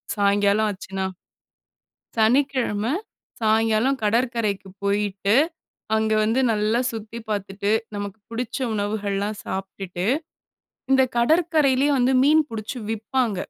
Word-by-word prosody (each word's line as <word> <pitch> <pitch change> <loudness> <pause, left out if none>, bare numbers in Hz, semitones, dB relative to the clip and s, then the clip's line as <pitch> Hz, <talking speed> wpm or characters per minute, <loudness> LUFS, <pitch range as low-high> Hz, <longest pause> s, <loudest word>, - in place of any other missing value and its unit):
சாயங்காலம் 205 +1 +3
ஆச்சுனா. 190 0 -5 1.1
சனிக்கிழமை 240 -1 +2 0.5
சாயங்காலம் 225 +4 +2
கடற்கரைக்கு 225 -3 0
போயிட்டு, 200 0 +1 0.6
அங்க 220 0 +1
வந்து 225 +4 +1
நல்லா 215 +2 +1
சுத்தி 225 0 -7
பார்த்துட்டு 200 -1 -2 0.3
நமக்கு 205 0 -5
புடிச்ச 230 0 -4 0.2
உணவுகள்லாம் 205 0 -2
சாப்பிட்டுட்டு, 190 -1 -5 0.9
இந்த 265 0 +6 0.2
கடற்கரையிலேயே 295 -1 +3
வந்து 250 +2 +3
மீன் 310 +2 +5
புடிச்சு 225 +3 -5
விப்பாங்க. 225 +1 -1
215 Hz, 95 wpm, -23 LUFS, 205-245 Hz, 1.1 s, இந்த